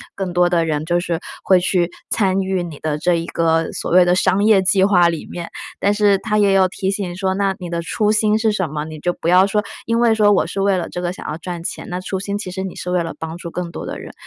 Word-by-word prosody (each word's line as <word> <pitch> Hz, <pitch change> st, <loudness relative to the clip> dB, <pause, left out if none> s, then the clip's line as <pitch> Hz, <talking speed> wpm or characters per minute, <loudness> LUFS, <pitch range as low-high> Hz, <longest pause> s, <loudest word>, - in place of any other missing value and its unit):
更 190 Hz, -2 st, -3 dB
多 175 Hz, 0 st, +3 dB
的 175 Hz, -1 st, +2 dB
人 155 Hz, -1 st, -2 dB
就 175 Hz, +1 st, +1 dB
是 170 Hz, -2 st, -2 dB, 0.2 s
会 185 Hz, -2 st, +5 dB
去 175 Hz, -1 st, +1 dB, 0.2 s
参 195 Hz, -3 st, +2 dB
与 190 Hz, -1 st, -1 dB
你 165 Hz, -4 st, -8 dB
的 150 Hz, -1 st, -2 dB
这 175 Hz, +2 st, +2 dB
一 165 Hz, 0 st, -2 dB
个 165 Hz, -1 st, 0 dB
所 -, -, -4 dB
谓 180 Hz, +1 st, +6 dB
的 175 Hz, -, +3 dB
商 185 Hz, +2 st, +2 dB
业 210 Hz, -3 st, +5 dB
计 190 Hz, 0 st, +3 dB
划 180 Hz, -4 st, +5 dB
里 165 Hz, -, -5 dB
面。 170 Hz, -1 st, -6 dB, 0.3 s
但 200 Hz, -, +2 dB
是 205 Hz, -1 st, +3 dB
它 210 Hz, 0 st, -1 dB
也 200 Hz, -2 st, +4 dB
有 190 Hz, -1 st, +4 dB
提 190 Hz, +1 st, -2 dB
醒 195 Hz, -3 st, -3 dB
说： 190 Hz, -1 st, 0 dB
“那 195 Hz, -1 st, 0 dB
你 180 Hz, -, -6 dB
的 170 Hz, 0 st, -2 dB
初 210 Hz, +5 st, 0 dB
心 215 Hz, 0 st, +2 dB
是 220 Hz, 0 st, +1 dB
什 190 Hz, -4 st, -1 dB
么？” 150 Hz, 0 st, -4 dB
你 155 Hz, -1 st, -8 dB
就 175 Hz, +3 st, 0 dB
不 165 Hz, -, -6 dB
要 180 Hz, +2 st, +6 dB
说 210 Hz, +1 st, 0 dB, 0.2 s
因 230 Hz, 0 st, +1 dB
为 235 Hz, -2 st, +4 dB
说 210 Hz, -2 st, +4 dB
我 195 Hz, -, +3 dB
是 195 Hz, +4 st, -3 dB
为 195 Hz, -1 st, +2 dB
了 175 Hz, -, -3 dB
这 175 Hz, -, -5 dB
个 175 Hz, 0 st, -1 dB
想 -, -, -9 dB
要 155 Hz, -, -4 dB
赚 175 Hz, -1 st, -6 dB
钱， -, -, -5 dB
那 180 Hz, +1 st, -3 dB
初 190 Hz, +1 st, -4 dB
心 200 Hz, +1 st, -3 dB
其 185 Hz, -3 st, -6 dB
实 190 Hz, +1 st, -4 dB
你 190 Hz, -, -6 dB
是 180 Hz, -, -5 dB
为 180 Hz, -1 st, +2 dB
了 165 Hz, -, -6 dB
帮 160 Hz, +1 st, -6 dB
助 170 Hz, -1 st, -7 dB
更 175 Hz, -1 st, -4 dB
多 -, -, -7 dB
的 -, -, -5 dB
人。 -, -, -10 dB
180 Hz, 305 characters per minute, -19 LUFS, 170-200 Hz, 0.3 s, 谓